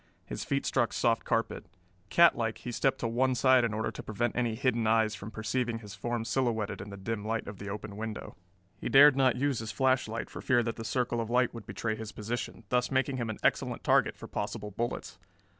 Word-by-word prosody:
His - - -5
feet - - -1
struck - - +1
soft - - +1
carpet. - - -1 0.4
Catlike, 120 -10 +4
he 120 - -6
stepped 135 +3 +1
to 115 - 0
one 130 +3 +1
side 130 0 +5
in 115 - +1
order 110 0 -2
to - - -7
prevent 110 +2 -2
any 120 -2 0
hidden 120 -3 +1
eyes 110 -1 +3
from 105 0 -7
perceiving 115 +2 -2
his 105 -3 -10
form 115 +3 -3
silhouetted 115 -6 -1
in 100 - -8
the 100 - -8
dim 105 +2 -3
light 115 +1 -2
of 100 -1 -8
the 100 - -6
open 105 0 -6
window. 110 0 -6 0.4
He - - -3
dared 140 +1 +8
not 130 -3 +3
use 135 -1 0
his 110 0 -4
flashlight 130 -4 +1
for - - -7
fear 120 -3 +3
that 115 0 -3
the 115 - -5
circle 120 +1 0
of 115 - -4
light 125 0 +2
would 115 -3 -9
betray 110 -1 -2
his 110 -1 -7
position, 115 +1 -4
thus 125 0 +1
making 135 0 +1
him 120 -3 -2
an 110 - -4
excellent - - +1
target - - +3
for - - -9
possible 105 0 -4
bullets. 120 +4 -4
115 Hz, 220 wpm, -30 LUFS, 110-125 Hz, 0.4 s, dared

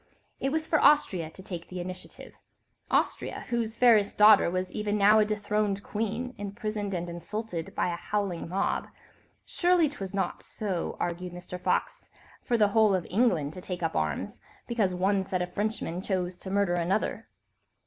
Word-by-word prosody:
It 270 - 0
was 315 +1 0
for 310 -1 +2
Austria 195 - +4
to 185 +4 -11
take 175 -3 -6
the 180 - -6
initiative; 180 +1 -8 0.6
Austria, - - 0
whose 230 -2 -1
fairest 225 -5 +4
daughter 210 -3 +7
was 185 +1 -2
even 210 -1 -1
now 210 +2 +6
a 215 - +4
dethroned 210 -1 -1
queen, 225 +4 -3
imprisoned 205 0 -3
and 175 0 -3
insulted 175 0 -5
by 175 - 0
a - - -4
howling 195 -4 -2
mob; 190 +3 0
and - - -20 0.5
surely 350 -2 +3
'twas 200 -9 -6
not—so 190 0 -3
argued 175 +1 -3
Mr. 180 0 -7
Fox—for 240 - -2
the 210 -2 +4
whole 215 -1 +4
of 180 - -2
England 180 - +2
to 185 - -8
take 180 -1 -5
up 165 - -1
arms, 80 -2 -2 0.3
because 210 -6 0
one 195 +2 +2
set 185 -1 -1
of 180 0 -7
Frenchmen 205 -4 -2
chose 185 -2 -2
to 190 - -7
murder 200 -2 +2
another. 175 +4 -1
200 Hz, 165 wpm, -28 LUFS, 180-215 Hz, 0.6 s, daughter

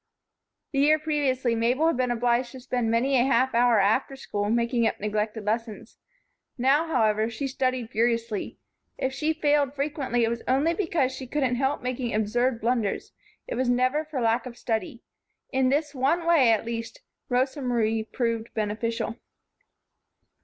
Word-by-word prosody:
The 275 - -1
year 300 +2 +5
previously 280 -6 0
Mabel 240 +6 +1
had 330 - +3
been 255 -1 +1
obliged 240 +1 0
to 260 - -8
spend 245 -2 -2
many 255 +4 +2
a - - +4
half 260 0 +2
hour 235 -1 +4
after 220 +7 +1
school, 205 -6 -3
making 235 0 +1
up - - -2
neglected 210 +1 -2
lessons. 220 0 -4 0.6
Now, 275 +6 +3
however, 220 -6 +2
she 235 +5 -4
studied 255 -3 -2
furiously. 230 -2 -1 0.4
If 265 0 -2
she 305 +3 0
failed 290 -3 +1
frequently 275 -4 -1
it 225 - +2
was 235 0 -3
only 280 +6 +2
because 330 -8 0
she 260 0 -7
couldn't 265 -2 0
help 265 +1 0
making 250 -2 -2
absurd 230 +3 +1
blunders; 230 -3 -1 0.3
it - - -5
was 255 -1 0
never 255 +5 +2
for 305 -3 -5
lack 230 +2 +1
of 240 -1 -10
study. 225 0 -3 0.5
In 260 -1 +2
this 295 +2 0
one 285 +6 +1
way, 310 -9 +5
at 225 0 +1
least, 230 - -5 0.3
Rosa 260 +3 0
Marie 225 -3 0
proved 230 0 -2
beneficial. 225 +2 -2
250 Hz, 160 wpm, -26 LUFS, 230-270 Hz, 0.6 s, year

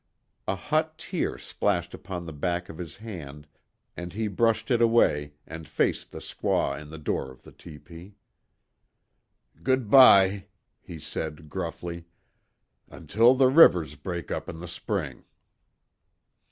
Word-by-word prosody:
A 95 - 0
hot 155 +9 -1
tear - - -3
splashed 90 -4 -2
upon 90 -3 -7
the 80 - -7
back 90 +4 -2
of 80 - -10
his 85 -3 -8
hand, 80 -10 -9 0.5
and 85 +1 -7
he 110 +2 -2
brushed 110 +3 0
it 120 -1 +3
away 75 -11 +3
and 80 -1 -9
faced - - -1
the - - -10
squaw 70 - -1
in 75 - -12
the 80 - -9
door 75 -3 -3
of 65 0 -16
the - - -14
tepee: 85 +4 -13 1.5
"Goodbye," 105 -6 +5 0.3
he 85 - -10
said, 75 0 -6
gruffly, 85 -1 -5 0.8
"Until 115 +4 +3
the 130 0 +4
rivers 90 - +6
break 85 +3 -6
up - - -4
in - - -7
the 90 - -8
spring." 85 0 -4
90 Hz, 135 wpm, -26 LUFS, 80-110 Hz, 1.5 s, rivers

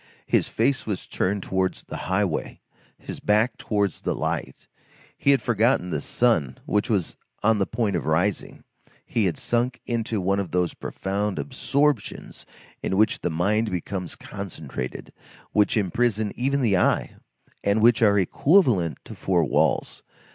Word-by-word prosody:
His - - +1
face 140 -4 0
was 100 -4 -3
turned 100 +1 -1
towards 95 0 -1
the - - -8
highway, 95 -4 -1 0.4
his - - -8
back 110 +4 +2
towards 100 -4 -1
the - - -1
light; - - -3 0.5
he - - 0
had 135 -4 +4
forgotten 115 -5 +2
the - - -1
sun 85 - +1
which 105 0 0
was 100 -6 0 0.3
on 110 0 +3
the 100 - +1
point 115 -4 -1
of 85 - -2
rising; 90 +6 0 0.4
he 110 -3 0
had 85 -4 0
sunk 120 +1 -1
into 115 -2 -1
one 95 +2 +1
of 95 -3 -3
those 90 -1 0
profound 100 +1 -3
absorptions 140 -2 -1 0.3
in 95 - -1
which 110 +1 +2
the - - 0
mind 105 +7 +1
becomes 90 0 -4
concentrated, 80 -10 -7 0.4
which 105 +1 +3
imprison 105 +1 +1
even 140 +3 0
the 100 -6 +3
eye, - - +1 0.5
and 100 +2 +2
which 120 0 +5
are 105 -2 +5
equivalent 105 - +3
to - - -9
four 90 -4 +1
walls. - - +1
105 Hz, 150 wpm, -24 LUFS, 90-115 Hz, 0.5 s, which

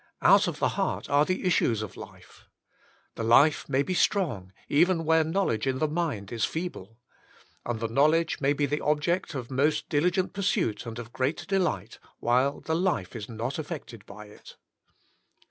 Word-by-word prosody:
Out - - +6
of - - -3
the - - +1
heart - - -2
are 145 +1 +4
the 185 +2 -2
issues 120 - +2
of 105 - -8
life. - - -13 0.7
The 115 - -5
life 140 +8 +4
may 135 0 +2
be 185 - -3
strong, 145 - 0 0.2
even 165 +2 +2
where 160 0 +4
knowledge 160 - -1
in 130 -1 0
the 155 - +1
mind 150 - -3
is 115 -2 -2
feeble. 135 - -4 0.7
And 120 -2 -2
the 115 - -2
knowledge 155 +8 +2
may 140 +1 +3
be 145 0 0
the 145 +2 -2
object 150 +3 0
of 125 -1 -6
most 150 +3 +1
diligent 180 +5 +1
pursuit 180 - -1
and 115 0 -6
of 120 0 -8
great 140 +5 -2
delight, 175 - -1 0.2
while 130 +4 +1
the 160 - -2
life 170 - -1
is 105 - -7
not 120 +6 -4
affected 145 - -7
by 105 +1 -10
it. 105 - -15
145 Hz, 175 wpm, -27 LUFS, 115-165 Hz, 0.7 s, Out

